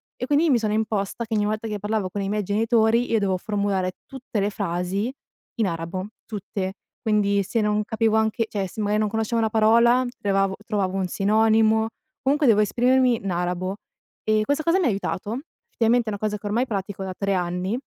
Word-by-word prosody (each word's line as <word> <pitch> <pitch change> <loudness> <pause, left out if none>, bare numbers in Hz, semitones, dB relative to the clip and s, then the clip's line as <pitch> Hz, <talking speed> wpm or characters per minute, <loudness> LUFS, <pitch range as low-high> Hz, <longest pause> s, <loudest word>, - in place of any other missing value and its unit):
e - - -4
quindi 295 +4 +3
mi 250 -4 +4
sono 215 -2 -1
imposta 215 0 -1
che 225 - -5
ogni 210 - +2
volta 215 +2 -2
che 210 -1 -3
parlavo 210 -1 -1
con 200 +2 -4
i 195 - -2
miei 210 0 0
genitori, 225 +3 +2
io 225 - +3
dovevo 190 -2 +1
formulare 200 -2 -1
tutte 260 -5 -5
le 200 +1 +1
frasi 195 +3 -2 0.4
in 225 -4 +1
arabo, 170 +2 -4 0.2
tutte, 195 -2 -4 0.3
quindi 200 -2 +2
se 230 +5 -1
non 210 0 +1
capivo 220 0 +1
anche 220 +1 +1
cioè 195 -2 -2
se 220 - -10
magari 210 0 +1
non 215 -1 +1
conoscevo 225 +2 -1
una 220 - +1
parola, 235 +3 +4
trovavo 195 -1 +1
trovavo 195 -3 -1
un 190 -1 0
sinonimo, 220 +3 +3 0.3
comunque 285 +2 +2
devo 215 -3 +5
esprimermi 245 +2 +3
in 195 - -2
arabo, 180 +2 -2 0.5
e 215 0 +2
questa 290 +4 0
cosa 335 +3 +3
mi 365 - +1
ha - - +4
aiutato. 205 +2 -3 0.3
Effettivamente 235 - +2
è - - -3
una 205 - -5
cosa 210 0 -1
che 210 - -14
ormai 235 +5 0
pratico 195 -2 -4
da 190 -1 -4
3 200 -1 0
anni 180 +4 -1
210 Hz, 200 wpm, -24 LUFS, 195-225 Hz, 0.5 s, devo